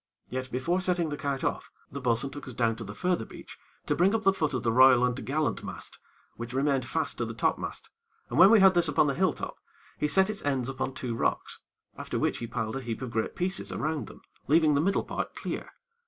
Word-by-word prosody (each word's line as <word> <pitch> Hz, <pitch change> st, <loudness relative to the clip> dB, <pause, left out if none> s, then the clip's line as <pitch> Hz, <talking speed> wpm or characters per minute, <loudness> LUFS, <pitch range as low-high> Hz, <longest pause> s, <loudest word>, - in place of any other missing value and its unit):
Yet, 130 Hz, 0 st, -3 dB
before 170 Hz, +9 st, 0 dB
setting 180 Hz, -3 st, 0 dB
the 145 Hz, -, -3 dB
kite 140 Hz, -2 st, -3 dB
off, -, -, -2 dB, 0.2 s
the 140 Hz, -, -6 dB
bo'sun 125 Hz, +2 st, 0 dB
took 145 Hz, -, -9 dB
us 130 Hz, -, -8 dB
down 115 Hz, -1 st, +1 dB
to 115 Hz, -, -6 dB
the 100 Hz, 0 st, -8 dB
further 180 Hz, -4 st, 0 dB
beach -, -, -12 dB, 0.3 s
to -, -, +1 dB
bring 190 Hz, +5 st, +3 dB
up 220 Hz, -, -1 dB
the 195 Hz, -, +5 dB
foot 155 Hz, -7 st, -1 dB
of 125 Hz, -, -2 dB
the 115 Hz, -, +2 dB
royal 125 Hz, 0 st, +7 dB
and 125 Hz, -1 st, 0 dB
t'gallant 145 Hz, +4 st, -1 dB
mast, -, -, -8 dB, 0.4 s
which 120 Hz, +2 st, -6 dB
remained 135 Hz, -2 st, +1 dB
fast -, -, -2 dB
to -, -, 0 dB
the -, -, -6 dB
topmast, -, -, -2 dB, 0.4 s
and -, -, -2 dB
when 190 Hz, +2 st, +10 dB
we 220 Hz, -2 st, +7 dB
had 190 Hz, -1 st, +7 dB
this 175 Hz, -1 st, +3 dB
upon 145 Hz, 0 st, +3 dB
the 140 Hz, -, +1 dB
hill 185 Hz, +3 st, +2 dB
top, -, -, -7 dB, 0.4 s
he 150 Hz, -, +1 dB
set 190 Hz, +5 st, +3 dB
its 210 Hz, -, -7 dB
ends 135 Hz, -3 st, 0 dB
upon 130 Hz, 0 st, -3 dB
two 125 Hz, -2 st, -3 dB
rocks, 115 Hz, -, -1 dB, 0.4 s
after -, -, -3 dB
which -, -, 0 dB
he 115 Hz, -, -4 dB
piled 115 Hz, 0 st, -3 dB
a -, -, -4 dB
heap 120 Hz, 0 st, -5 dB
of 125 Hz, -, -5 dB
great 110 Hz, -1 st, -2 dB
pieces 185 Hz, +2 st, -2 dB
around 155 Hz, -1 st, -2 dB
them, -, -, -14 dB, 0.2 s
leaving 155 Hz, +1 st, +4 dB
the 140 Hz, -, +3 dB
middle 195 Hz, +4 st, +1 dB
part -, -, -4 dB
clear. -, -, -5 dB
140 Hz, 240 wpm, -28 LUFS, 125-170 Hz, 0.4 s, when